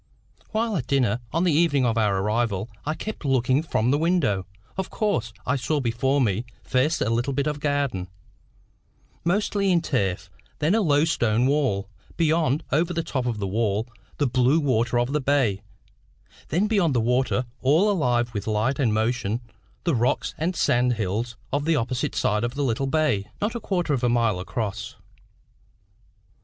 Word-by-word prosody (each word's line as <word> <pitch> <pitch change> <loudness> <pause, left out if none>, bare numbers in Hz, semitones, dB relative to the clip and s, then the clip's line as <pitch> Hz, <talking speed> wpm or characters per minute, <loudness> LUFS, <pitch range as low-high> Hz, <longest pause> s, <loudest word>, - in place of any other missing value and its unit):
While 220 0 -1
at 125 -5 -4
dinner, 125 -5 +2
on 165 - +1
the 180 - +3
evening 145 -4 +3
of 115 -2 +1
our 105 -3 +2
arrival, 105 +1 -1 0.2
I 155 - 0
kept 215 +1 -6
looking 130 0 +2
from 125 -6 0
the 145 - +2
window, 155 - +1 0.3
of 190 0 -3
course, 200 - -1
and 115 - -21
I 130 - +1
saw 145 +4 0
before 130 +3 +1
me, 110 -3 +1 0.2
first 130 +6 +1
a - - +1
little 120 +4 0
bit 140 +1 0
of 150 -1 -2
garden, 140 -11 -1 1.2
mostly 200 +2 +1
in 175 - +4
turf, 95 - -1 0.3
then 155 +4 +1
a 225 - +3
low 150 -4 +3
stone 120 -7 +1
wall; 130 -9 +1 0.3
beyond, 160 -2 +2
over 165 +4 +1
the 165 - 0
top 130 -5 -2
of 115 -3 -1
the 100 - -3
wall, 105 +1 0 0.3
the 145 - +1
blue 130 +4 +3
water 120 -5 +1
of 120 +3 0
the 150 - +1
bay; 130 -8 +1 0.9
then 180 +8 +2
beyond 195 - +2
the - - +3
water, 125 +2 +1 0.2
all 160 +11 +4
alive 120 - +1
with 100 -1 -4
light 110 +6 0
and 115 -6 +2
motion, 110 0 0 0.4
the 170 - +1
rocks 120 0 0
and 170 +4 -1
sand 125 -4 +2
hills 110 +2 -2 0.2
of 145 +1 0
the 165 0 +3
opposite 130 +2 -1
side 105 +1 +1
of 120 +2 -2
the 145 - -1
little 135 +1 0
bay, 135 -9 +1
not 210 +2 -1
a 235 - -3
quarter 175 -7 -1
of 130 -3 -1
a 120 - +3
mile 115 -5 +2
across. 100 +1 -4
130 Hz, 180 wpm, -24 LUFS, 115-155 Hz, 1.2 s, in